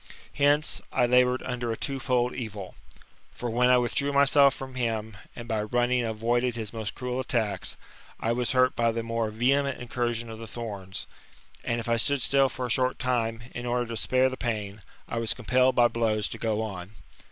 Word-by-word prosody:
Hence, 145 +1 +2
I 125 - +3
laboured 125 +1 +3
under 120 -2 -3
a 115 - -3
two 135 -1 -3
fold 125 -1 +1
evil. 105 -6 -6 0.6
For 120 -1 -4
when 125 +2 +3
I 125 - +6
withdrew 125 +4 +1
myself 140 0 +5
from 130 -1 -8
him, 110 -4 -2 0.2
and 120 -1 -8
by 110 -2 0
running 120 +3 +1
avoided 120 +2 0
his 110 -2 -5
most 110 -3 -4
cruel 125 0 -3
attacks, 110 -7 -1 0.4
I 115 - 0
was 120 +1 0
hurt 130 0 +3
by 115 -1 +2
the 115 0 -2
more 115 -1 -1
vehement 135 +5 +1
incursion 120 -1 -2
of 110 - -8
the 115 - -8
thorns: 100 -5 -5 0.6
and 120 0 -1
if 120 - -6
I 115 0 +2
stood 135 +2 +1
still 135 -1 +4
for 130 0 -4
a 120 - -3
short 130 +3 +1
time, 115 -3 -1
in 120 0 -5
order 120 0 0
to 115 - -4
spare 130 +3 +2
the 130 - -6
pain, 105 -4 -3 0.3
I 115 - -3
was 115 -1 +1
compelled 125 +2 +2
by 120 -1 +6
blows 110 -2 0
to 115 - -7
go 110 -1 0
on. 95 -2 -7
120 Hz, 200 wpm, -27 LUFS, 115-125 Hz, 0.6 s, I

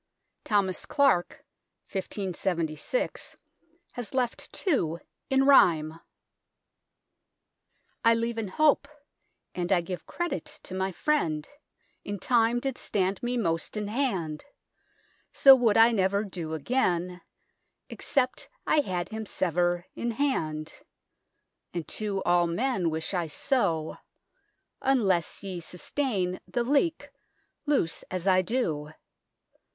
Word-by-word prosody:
Thomas 200 -4 0
Clarke, 275 -12 +2 0.5
1576, 185 - -3 0.5
has 245 -1 -6
left 250 -2 -1
two, 170 - 0 0.3
in 270 0 +3
rhyme: 165 - +5 2.0
I 230 -1 +6
leve 230 0 -2
in 220 - -2
hope, 290 +7 +3 0.7
and 175 0 -3
I 180 -2 +4
give 180 +1 -7
credit 345 -2 -3 0.2
to - - -9
mi 190 +1 -1
frinde, 170 - 0 0.5
in 205 0 -4
time 235 +3 +2
did 265 0 -3
stande 195 -1 -1
me 245 +1 -1
moste 165 -3 -1
in 210 -1 -3
hande, 190 - -1 0.9
so 270 -1 +8
woulde 230 -4 +3
I 225 +1 +7
never 200 -1 +1
do 170 -6 -5
againe, 180 - 0 0.7
except 255 -3 -1 0.2
I 310 - +3
hade 180 -9 -2
hime 220 0 -5
sver 175 -1 0
in 235 - -3
hande, 160 - -1 1.0
and 165 -4 -3
to 205 -3 -2
al 175 0 +4
men 190 0 0
wishe 160 +3 -3
I 175 -3 0
so, 165 - 0 0.8
unles 200 -13 +1
ye 190 -3 -5
sussteine 185 - -2
the 240 - -1
leke 295 +6 +1 0.6
lose 265 - +1
as 185 0 -3
I 185 -1 +5
do. 175 - -2
195 Hz, 115 wpm, -28 LUFS, 175-245 Hz, 2.0 s, so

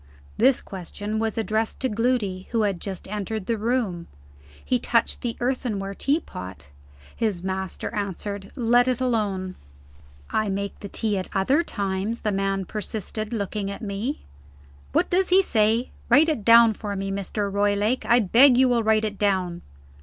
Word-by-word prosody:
This 255 +3 +3
question 205 +3 -5
was 225 -1 -1
addressed 220 0 -1
to 260 - +2
Gloody, 215 -5 -1
who 230 -2 +1
had 195 -4 -1
just 195 -3 -6
entered 210 0 -4
the 230 - 0
room. 215 -6 -1 0.6
He 250 - +1
touched 230 -1 +1
the 235 -2 -3
earthenware 235 -6 -2
teapot. 95 - -3 0.5
His 205 -6 -1
master 190 +1 -4
answered: 200 -1 -4
"Let 245 -1 +3
it 255 -1 +1
alone." 205 -7 -1 0.8
"I 215 -1 +1
make 200 +1 -3
the 200 - -7
tea 210 -2 -1
at 185 - -6
other 260 +12 +3
times," 200 - -3
the 210 - 0
man 195 -1 -1
persisted, 215 +1 -5
looking 205 -2 -2
at 200 - -7
me. 210 +7 -3 0.7
"What - - +1
does 370 +1 +2
he 380 +1 +6
say? 225 - +1 0.2
Write 315 +3 +6
it 295 -9 -1
down 230 0 +7
for 205 -1 -5
me, 195 0 -3
Mr. 200 +1 -3
Roylake. 205 +4 +1
I 240 +1 +5
beg 245 +6 +6
you 260 0 +5
will 240 -2 +2
write 220 0 +2
it 205 -2 -4
down." 185 -4 0
210 Hz, 160 wpm, -24 LUFS, 195-235 Hz, 0.8 s, down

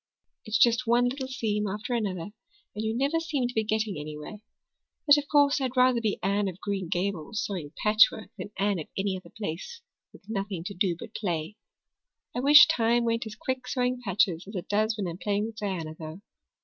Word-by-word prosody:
It's 215 0 +1
just 235 +1 +4
one 240 +1 +4
little 260 +1 -4
seam 210 -5 -1
after 210 +5 -4
another 200 -5 -2 0.4
and 210 - -4
you 220 +1 -1
never 280 +5 +1
seem 300 -7 -1
to 245 - -7
be 220 - +1
getting 215 -5 -1
anywhere. 150 +6 -7 0.7
But 290 -1 +7
of 285 - -7
course 285 -1 +4
I'd 260 -1 -2
rather 250 -1 +4
be 215 -3 0
Anne 200 +1 +1
of 185 -1 -6
Green 195 -4 -3
Gables 185 +2 -2
sewing 175 -8 -5
patchwork 215 0 +4
than 195 -1 -7
Anne 200 -2 +1
of 155 - -6
any 195 0 0
other 185 - -9
place 220 - -6 0.3
with 195 - -18
nothing 195 -5 -3
to 200 - -5
do 185 -2 +1
but - - -10
play. 170 -2 -3 0.8
I - - 0
wish 290 +4 +9
time 235 +1 +2
went 230 0 0
as 215 - -8
quick 255 +2 -4
sewing 250 0 -1
patches 190 -4 +1
as 205 - -9
it 180 - -4
does 215 +2 +1
when 200 -3 -2
I'm 170 +1 -6
playing 205 +1 0
with 225 -1 -8
Diana, 185 -7 -3
though. 160 +3 -9
210 Hz, 200 wpm, -27 LUFS, 190-240 Hz, 0.8 s, wish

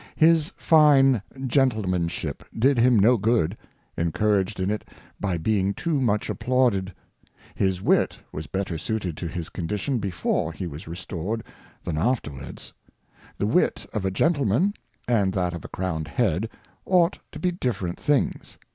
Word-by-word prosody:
His 160 +1 +4
fine 140 - +5 0.2
Gentlemanship 90 - 0 0.2
did 130 +2 +3
him 120 0 +5
no 115 +5 +5
Good, 105 -4 +1 0.4
encouraged 95 +4 0
in 95 +2 0
it 105 - -2 0.4
by 95 -4 -1
being 100 +3 +1
too 160 -5 0
much 105 -4 +1
applauded. 120 -7 +1 0.6
His 95 -1 0
Wit - - +2
was 75 -1 -6
better 95 0 -3
suited 95 -3 -2
to 85 - -4
his 85 0 -5
Condition 105 - -2
before 85 -4 -1
he 95 - -5
was 80 +1 -7
restored 90 +5 -4 0.4
than 80 -3 -2
afterwards. 80 - -3 0.6
The - - 0
Wit - - +1
of 105 - -2
a 95 - +1
Gentleman, 140 - +2 0.3
and 105 -6 +2
that 90 -2 0
of 85 - -6
a - - -7
crowned 80 -4 -3
Head, 110 +1 0 0.3
ought 180 0 +3
to - - -8
be 180 - 0
different 105 - -3
things. 145 -2 0
100 Hz, 145 wpm, -25 LUFS, 90-125 Hz, 0.6 s, fine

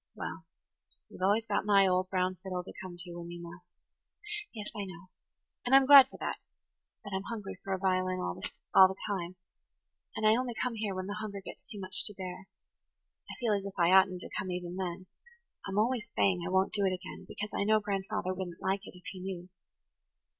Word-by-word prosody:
"Well, - - -6 0.6
you've - - -12
always 205 +4 +3
got 205 -2 0
my 200 -1 +5
old 185 0 +2
brown 185 -1 0
fiddle 185 -2 -3
to - - -10
come 185 -2 -8
to 175 0 -8
when 170 0 -7
you 175 0 -7
must." 170 +1 -12 0.7
"Yes, 210 -3 -6
I 205 -1 -3
know. 185 0 -11 0.5
And 255 +2 +4
I'm 270 0 +8
glad 275 -1 +11
for - - -11
that. - - -3 0.6
But 205 -2 -7
I'm 190 - 0
hungry 210 -4 -5
for 195 - -5
a 190 - +1
violin 185 -1 +1
all 90 - -2 0.5
the 190 - -5
time. 185 -3 -3 0.8
And 215 - -1
I 215 +1 +7
only 245 -1 -1
come 250 +1 -1
here 210 -3 -2
when 185 0 -3
the 205 +2 -4
hunger 205 -2 -5
gets 190 - -11
too 210 - -6
much 190 0 +1
to 210 - -4
bear. 185 0 -7 0.8
I - - -6
feel 230 -3 +2
as 200 -1 0
if 200 -1 -6
I 170 +1 +4
oughtn't 190 -1 +5
to - - -7
come 185 - -2
even 180 -1 -4
then–I'm 195 - -7
always 230 +1 +1
saying 185 -3 +3
I 170 - -3
won't 190 +1 +2
do 205 - 0
it 190 -1 +2
again, 185 +1 -9
because 210 +1 -5
I - - 0
know 215 +1 +4
grandfather 195 -2 -2
wouldn't 180 -2 -6
like 195 +1 0
it, - - -11
if 180 - -17
he 190 - -9
knew." 180 -1 -6
190 Hz, 210 wpm, -31 LUFS, 185-210 Hz, 0.8 s, glad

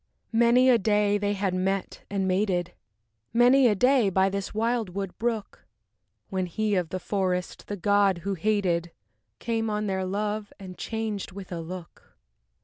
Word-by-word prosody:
VI - - 0
Many 245 +2 +5
a 235 - +5
day 205 0 +2
had 195 -2 -1
they - - -1
met 195 +1 -2
and 195 -1 -1
mated, 185 -2 0 0.6
Many 245 +3 +6
a 210 - +3
day 250 0 +4
by 190 +1 +3
this 200 0 -4
wildwood 215 -4 -2
brook, 225 -3 -3 0.6
When 185 -2 -1
he 215 +4 -1
of 180 -4 0
the 185 - -3
forest, 185 -2 -2
the 205 - -4
god 200 -1 +3
who 200 - 0
hated, 180 -3 0 0.5
Came 225 -2 -1
on 210 0 -1
their 190 -2 -1
love 205 +2 -2
and 185 -2 -9
changed 220 -3 -4
with 190 -1 -9
a 170 - -3
look. 175 +1 -10
200 Hz, 160 wpm, -26 LUFS, 185-215 Hz, 0.6 s, Many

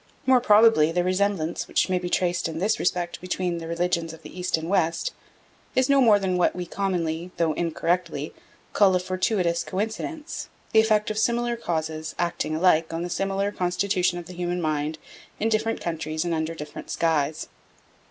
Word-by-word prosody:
More 260 -1 +5
probably 210 -8 +5
the 175 +1 +1
resemblance 185 -3 0
which - - +1
may 185 -1 +1
be 175 0 -4
traced 175 -1 +1
in 160 -1 -5
this 200 +6 +1
respect 175 -1 -1
between 180 -1 -2
the 165 - -7
religions 170 -1 -1
of 160 0 -13
the 150 - -11
East 180 -2 0
and 160 0 -5
West 180 - 0 0.6
is 260 +1 +3
no 280 -1 +5
more 220 -5 +6
than 190 -2 0
what 180 - +2
we 180 0 -4
commonly, 175 -3 -2
though 165 -2 +2
incorrectly, 165 -1 -1 0.4
call 195 -3 +5
a - - +3
fortuitous 185 -1 0
coincidence, 225 - -4 0.2
the 220 - +6
effect 215 0 +3
of 215 - -2
similar 240 +1 +1
causes 160 -6 -3
acting 170 -2 -1
alike 165 -1 +3
on 165 +1 -3
the 175 - -4
similar 195 +2 -1
constitution 180 -1 0
of 175 - -7
the 180 - -10
human 175 0 -2
mind 155 -1 -1 0.4
in 225 - +1
different 225 +1 0
countries 160 -1 -3
and 170 - 0
under 160 +1 -2
different 150 -1 -8
skies. 155 -2 0
180 Hz, 180 wpm, -25 LUFS, 165-200 Hz, 0.6 s, more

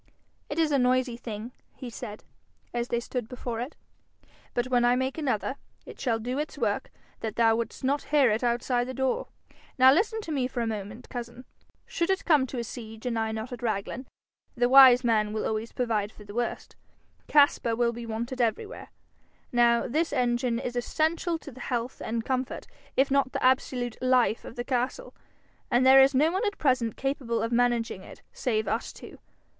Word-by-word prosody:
'It - - -4
is 320 -2 +2
a 280 - +3
noisy 250 -1 +2
thing,' 230 -1 -7 0.2
he 255 - -8
said, 215 -2 -8 0.5
as 240 0 -1
they 235 - 0
stood 240 -1 -5
before 245 -2 -5
it, 250 +6 -5 0.8
'but 240 - +1
when 245 -1 +2
I 240 0 +4
make 260 +1 -1
another, 270 -2 -1 0.3
it - - -11
shall 235 -4 +1
do 250 +5 -3
its 300 - -4
work - - -1 0.3
that 220 -2 -4
thou 225 -1 +4
wouldst 230 +3 -4
not 280 +2 0
hear 285 -6 +4
it 220 +3 -1
outside 245 +1 +1
the 260 - -5
door. 265 0 -1 0.5
Now 260 0 +8
listen 440 +7 +1
to 330 - -7
me 265 -4 0
for 250 -2 -4
a - - 0
moment, 215 +2 -5
cousin. 240 0 -7 0.4
Should 340 +1 -2
it 385 0 0
come 295 -6 +4
to 255 - -6
a 235 - -1
siege 225 -1 -9
and 235 -2 -1
I 220 0 -1
not 220 +2 -5
at 245 - -7
Raglan 230 +3 -3 0.5
the 245 -1 +2
wise 260 -1 +8
man 215 -3 +2
will 215 - -2
always 220 +1 -2
provide 220 -4 -1
for 210 - -14
the 205 0 -11
worst 240 +1 -3 0.5
Caspar 285 -5 +4
will 235 0 +1
be 235 0 -7
wanted 235 +3 -3
everywhere. 400 - -2 0.6
Now 235 -1 +3
this 315 +6 0
engine 245 -3 +1
is 245 0 -4
essential 320 +7 0
to 295 - -11
the 255 - -13
health 245 -2 -3
and 230 +1 -3
comfort, 260 0 -2 0.3
if 275 +1 +3
not 275 0 +4
to 260 - -16
the - - -2
absolute 255 -2 +1
life 255 -3 +2
of - - -9
the 240 - -3
castle, 255 - -2 0.6
and 250 0 +3
there 265 +1 +9
is 270 +1 +4
no 305 +5 +4
one 380 +5 -1
at 410 - -3
present 255 -6 +1
capable 255 -5 -1
of 230 - -2
managing 235 -4 +1
it - - -13
save 220 -4 -1
us 225 +4 -2
two. - - -12
245 Hz, 195 wpm, -27 LUFS, 230-265 Hz, 0.8 s, there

